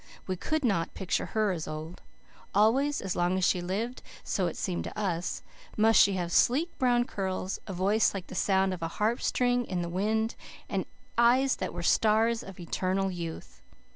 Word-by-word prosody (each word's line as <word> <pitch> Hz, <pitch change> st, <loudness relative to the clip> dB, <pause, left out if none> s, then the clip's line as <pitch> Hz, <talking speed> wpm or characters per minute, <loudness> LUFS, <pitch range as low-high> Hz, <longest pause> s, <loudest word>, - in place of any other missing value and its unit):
We 185 Hz, -, -2 dB
could 310 Hz, -, -1 dB
not 175 Hz, -8 st, 0 dB
picture 190 Hz, 0 st, -1 dB
her 215 Hz, -2 st, +1 dB
as 165 Hz, -4 st, -4 dB
old. 155 Hz, +3 st, -7 dB, 0.5 s
Always, 265 Hz, +8 st, +3 dB
as 190 Hz, -2 st, -3 dB
long 175 Hz, +1 st, +1 dB
as 185 Hz, -, +2 dB
she 180 Hz, -, +2 dB
lived, 210 Hz, +8 st, -3 dB, 0.2 s
so 185 Hz, -3 st, 0 dB
it 165 Hz, -, -5 dB
seemed 180 Hz, -2 st, -2 dB
to -, -, -6 dB
us, 180 Hz, -4 st, -2 dB, 0.3 s
must 220 Hz, +1 st, +5 dB
she 200 Hz, -, +5 dB
have 175 Hz, -2 st, -2 dB
sleek 300 Hz, -, +3 dB
brown 245 Hz, -2 st, +3 dB
curls, 190 Hz, -4 st, -3 dB
a 195 Hz, -, -4 dB
voice 200 Hz, +5 st, +2 dB
like 195 Hz, -3 st, -5 dB
the -, -, -11 dB
sound 190 Hz, 0 st, +2 dB
of 180 Hz, -, -7 dB
a 165 Hz, -, -1 dB
harpstring 245 Hz, +3 st, +1 dB
in 180 Hz, -2 st, -2 dB
the 170 Hz, -, -4 dB
wind, 220 Hz, +5 st, 0 dB, 0.3 s
and -, -, -2 dB, 0.3 s
eyes 255 Hz, +3 st, +4 dB
that -, -, -3 dB
were -, -, -6 dB
stars 225 Hz, +1 st, +3 dB
of 195 Hz, -1 st, -11 dB
eternal 185 Hz, +2 st, -1 dB
youth. 165 Hz, -, -7 dB
195 Hz, 185 wpm, -29 LUFS, 180-225 Hz, 0.5 s, must